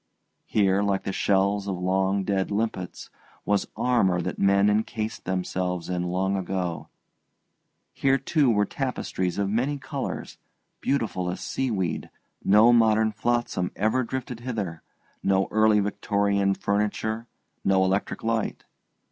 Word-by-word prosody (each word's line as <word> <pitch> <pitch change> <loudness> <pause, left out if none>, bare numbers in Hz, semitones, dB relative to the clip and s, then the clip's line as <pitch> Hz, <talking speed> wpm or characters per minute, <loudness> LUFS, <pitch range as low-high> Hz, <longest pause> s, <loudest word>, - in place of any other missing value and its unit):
Here, 100 -1 +2
like 100 -1 0
the - - -2
shells 100 +1 +1
of 95 -2 -2
long 95 +2 +1
dead 95 -1 0
limpets, 100 -4 -3 0.3
was 100 -1 +1
armour 100 -8 +2
that 85 - -4
men 100 +1 +4
encased 110 +1 -1
themselves 90 -1 -2
in 90 -1 -1
long 95 +2 0
ago; 90 -3 -3 1.1
here, 135 0 +2
too, 140 +1 +2
were 105 -2 +3
tapestries 100 -8 -2
of 100 -1 +1
many 125 +8 0
colours, 135 - -5 0.4
beautiful 110 -10 -1
as 90 - -4
seaweed; 105 -10 -2 0.3
no 110 +4 +6
modern 110 -1 +4
flotsam 120 -5 -1
ever 110 +5 +1
drifted 125 -1 -4
hither, 105 -10 -4 0.4
no 95 0 +2
early 110 -1 +4
Victorian 100 -1 +1
furniture, 105 +3 -1 0.4
no 95 -1 +3
electric 95 +2 -1
light. 115 -1 -1
100 Hz, 125 wpm, -26 LUFS, 95-110 Hz, 1.1 s, no